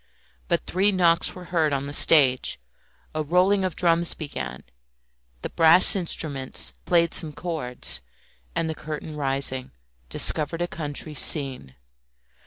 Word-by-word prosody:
But - - -1
three 195 +3 +1
knocks 170 -3 +1
were 180 - -10
heard 160 -3 +1
on 140 0 -2
the 145 - -7
stage, 135 - +3 0.5
a 155 - -2
rolling 180 +6 +1
of 185 -4 -3
drums 170 -1 +2
began, 65 - -7 0.8
the - - -4
brass 165 +4 +5
instruments 150 -7 -2
played 170 -1 +1
some 160 -3 +1
chords, 150 -8 -2 0.5
and 165 - -1
the 160 - -3
curtain 155 0 -8
rising, 135 -2 -2 0.4
discovered 155 - +1
a - - -3
country 150 -2 -5
scene. 135 - +3
155 Hz, 130 wpm, -23 LUFS, 140-170 Hz, 0.8 s, brass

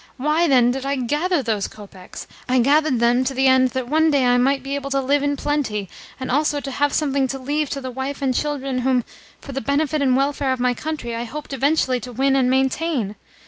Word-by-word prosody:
Why, 305 +6 +1
then, 250 -4 +4
did 265 +1 -4
I 275 +1 -1
gather 295 +6 0
those 215 -4 -1
kopecks? 195 -3 -11 0.2
I 255 - +3
gathered 280 +1 +3
them 240 +2 +3
to 270 +1 -2
the 265 +1 +2
end 260 -1 +5
that 255 -2 -2
one 315 +4 +3
day 280 -4 +2
I 245 0 +4
might 270 +1 +1
be 275 +1 -4
able 280 0 -3
to 275 0 +1
live 275 +2 +1
in 285 0 0
plenty, 235 -11 -2 0.3
and 260 - -4
also 295 +2 +1
to 275 -1 -6
have 290 +2 +1
something 275 -3 +1
to 270 - -4
leave 290 +2 -2
to 275 - -4
the 260 -1 -5
wife 265 +3 -4
and 270 -2 0
children 275 -2 -2
whom, 250 -1 +1 0.4
for - - -9
the 270 0 -3
benefit 290 +4 0
and 260 -2 +3
welfare 275 -1 0
of 260 - -5
my 250 0 +2
country, 270 -4 -5
I 235 +1 -3
hoped 285 +4 -7
eventually 270 -1 +1
to 245 +2 -8
win 270 +3 +1
and 260 -2 +2
maintain. 265 -4 0
270 Hz, 230 wpm, -21 LUFS, 250-285 Hz, 0.4 s, end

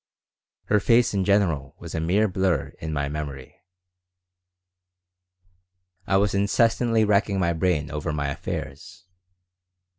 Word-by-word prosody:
Her 105 - +2
face 115 +3 +3
in 100 -1 +1
general 85 -9 +1
was - - -9
a 80 - -2
mere 95 +7 +2
blur 90 -6 0
in 80 - -5
my 70 -2 -1
memory 70 -3 -7 2.5
I 95 - +3
was 100 +1 +1
incessantly 115 +3 +2
racking 100 -1 +1
my 85 -2 +1
brain 80 -4 0
over 75 0 -3
my 70 -2 -2
affairs. 85 +7 -7
90 Hz, 120 wpm, -24 LUFS, 75-100 Hz, 2.5 s, face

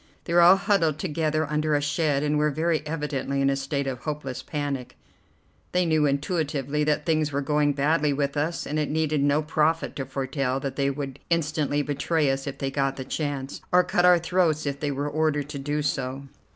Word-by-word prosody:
They 170 - -4
were 175 - +6
all 175 +2 +8
huddled 175 -7 +1
together 155 -1 -1
under 150 0 0
a - - +3
shed, 145 -1 0
and 150 0 +1
were 150 0 +3
very 160 +2 0
evidently 150 -3 -2
in 135 0 +3
a - - +1
state 140 +1 -2
of 130 -2 -3
hopeless 135 -4 -4
panic. 140 -2 -4 0.8
They 180 0 +2
knew 155 -2 +3
intuitively 145 -1 -1
that 150 0 0
things 155 -3 +1
were 140 0 -1
going 150 0 +2
badly 150 +1 +2
with 140 0 -1
us, 155 +4 -1
and 150 +1 -2
it 150 - -1
needed 155 -1 0
no 145 +2 +2
prophet 155 +1 0
to 135 -2 -4
foretell 135 0 -2
that 135 -1 -4
they 140 -1 +1
would 140 -1 -5
instantly 150 -3 0
betray 145 +1 0
us 135 +1 -3
if 140 - -4
they 135 0 -2
got 135 -1 0
the 130 - -6
chance, 140 -1 -4
or 180 0 +5
cut 175 - +1
our 180 0 +7
throats 170 -3 +1
if 140 -1 -2
they 145 - -1
were 140 +1 -2
ordered 150 -1 0
to 145 -2 -5
do 150 +2 -2
so. 135 -1 -2
145 Hz, 205 wpm, -25 LUFS, 140-155 Hz, 0.8 s, all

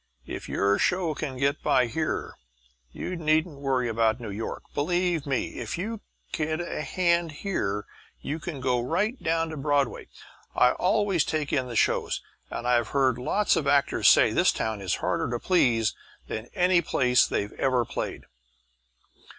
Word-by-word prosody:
If - - -7
your 100 +1 +2
show 180 -3 +1
can 140 -4 -5
get 140 +3 0
by 130 -2 +3
here 155 +7 -2 0.6
you 180 - -5
needn't 155 -2 +1
worry 130 -3 0
about 115 0 +1
New 115 -4 -6
York. 110 +3 -5
Believe 175 0 0
me, 135 -3 -2
if 115 +4 -4
you 215 +4 -4 0.3
get 155 0 -1
a 175 -3 -4
hand 170 +2 +1
here 105 - -2 0.3
you 155 +3 -4
can 155 -4 -6
go 125 -2 +1
right 200 - -1
down 165 0 0
to 155 - -6
Broadway. 140 -2 0 0.5
I 125 - +5
always 195 -3 +1
take 155 -2 -2
in 130 -3 +1
the 120 - -6
shows, - - +1 0.3
and 120 - -4
I've 120 -2 +3
heard 130 -2 +1
lots 205 +11 +2
of 140 - -1
actors 140 0 +4
say - - +6
this - - +4
town 110 -2 -3
is 95 - 0
harder - - 0
to 120 - -1
please 120 - +2 0.3
than 110 +2 -5
any 180 -2 +4
place 125 -6 +3
they 100 - -1
ever 125 -3 +2
played." - - -5
140 Hz, 165 wpm, -26 LUFS, 125-170 Hz, 0.6 s, say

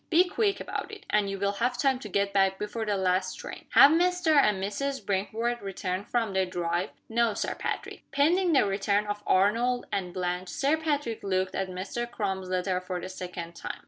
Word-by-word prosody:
Be 355 +2 +5
quick 400 +2 0
about - - -5
it 420 - -10
and 210 -1 +2
you 195 - -3
will 200 +1 +1
have 240 +4 -1
time 265 0 +2
to 215 - -8
get 200 +1 0
back 195 -1 +3
before 215 +2 -4
the 205 -1 +1
last 185 0 +1
train. - - -9
Have 280 - +9
Mr. 355 0 +2
and 210 -8 +5
Mrs. 210 +6 -3
Brinkworth 220 +5 -1
returned 190 0 -4
from 225 -4 0
their 190 -1 +1
drive?" 175 0 -1 0.2
"No, 230 -1 +1
Sir - - -1
Patrick." - - -4
Pending 340 +6 +3
the 275 -8 +4
return 200 +1 +1
of 205 0 -3
Arnold 230 +6 +2
and 180 -2 -2
Blanche, 180 0 -3
Sir 280 +3 +1
Patrick 290 -7 -2
looked 185 -1 -1
at 190 -1 -2
Mr. 195 +6 -4
Crum's 190 -5 -3
letter 185 0 0
for 180 -1 -4
the 185 - -6
second 180 -2 -7
time. - - -6
205 Hz, 200 wpm, -28 LUFS, 190-245 Hz, 0.2 s, Have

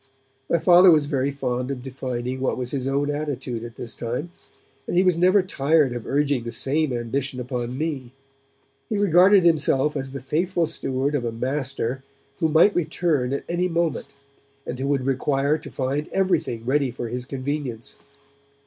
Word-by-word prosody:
My 170 - +3
Father 175 +3 +7
was 155 -4 +5
very 140 -2 0
fond 125 -2 -3
of 130 -3 -4
defining 130 -1 -4
what 130 - -1
was 125 -1 -3
his 135 -2 -2
own 140 +2 0
attitude 135 -5 -4
at 120 0 -9
this 115 -2 -7
time, 125 +9 -4 0.6
and - - -1
he 185 - +5
was 180 -2 +3
never 185 +3 +4
tired 150 -5 +2
of 120 -2 -6
urging 140 -3 +1
the 115 - -5
same 140 +5 +1
ambition 125 +2 -3
upon 125 0 -4
me. 140 -5 -3 0.8
He 215 - -1
regarded 190 0 +5
himself 150 -3 +2
as 135 -2 -4
the 135 - -5
faithful 170 +6 0
steward 140 -3 -2
of 145 -4 0
a 120 - -2
Master 130 +1 -3 0.4
who 160 - +2
might 165 +7 +5
return 155 -5 0
at 140 - -2
any 175 +1 0
moment, 165 -5 -2 0.5
and 125 - -5
who 135 - -2
would 140 -3 0
require 140 +2 +1
to - - -10
find 140 +3 -2
everything 175 -12 0
ready 140 +1 +1
for 120 0 -5
his 125 +2 -5
convenience. 135 -4 -4
140 Hz, 175 wpm, -23 LUFS, 125-160 Hz, 0.8 s, Father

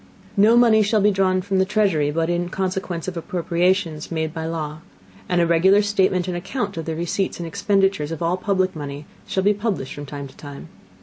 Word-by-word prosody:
No 215 +4 +5
Money 230 -3 +5
shall 215 +1 +2
be 210 +1 +4
drawn 185 -1 +1
from 195 -1 0
the - - +5
Treasury, 190 -7 +1
but 165 +2 0
in 175 0 -1
Consequence 185 -2 -3
of 185 - -4
Appropriations 170 -1 -1
made 160 -1 -2
by 160 -1 -4
Law; 155 -2 -4 0.5
and 180 -1 +2
a 170 - +4
regular 190 +5 +4
Statement 190 -3 +1
and 180 - -2
Account 200 +3 -3
of 165 - -5
the 160 - -3
Receipts 175 +4 -2
and 170 - -4
Expenditures 195 -2 +1
of 165 - -4
all 170 +1 +1
public 185 -1 0
Money 145 -1 -6 0.2
shall 190 - -1
be 205 +1 +4
published 205 - -3
from 145 0 -8
time 140 0 -6
to 135 - -17
time. 145 +2 -10
180 Hz, 205 wpm, -22 LUFS, 160-195 Hz, 0.5 s, No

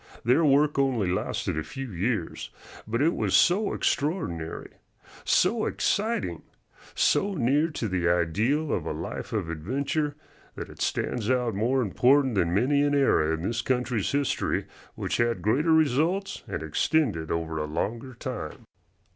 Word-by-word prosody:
Their 125 +8 +3
work 145 0 +3
only 120 -9 +1
lasted 90 -3 -2
a - - -3
few 135 - -7
years, 95 0 -2 0.4
but 115 +5 0
it 165 +3 +3
was - - 0
so 200 +4 +4
extraordinary, 90 - -2 0.5
so - - +2
exciting, 210 - -1 0.5
so 200 0 +2
near 145 +3 +2
to 145 -8 -4
the 90 -3 0
ideal 105 - +1
of - - -2
a - - -2
life - - -6
of - - -2
adventure, 140 - -2 0.4
that - - -7
it - - -12
stands 115 -2 -1
out 125 -3 +1
more 125 +6 +1
important 130 +5 +3
than 85 -5 +1
many 130 +10 +2
an 145 0 +2
era 105 - +3
in 80 - -7
this 115 +5 -1
country's 125 -5 -1
history 140 -1 0 0.3
which - - -2
had 120 0 0
greater 140 +10 +2
results 160 +6 +2
and 75 - -4
extended 80 - 0
over 80 -1 -2
a 75 - -1
longer 115 - -4
time. 120 -10 -6
125 Hz, 150 wpm, -26 LUFS, 95-145 Hz, 0.5 s, so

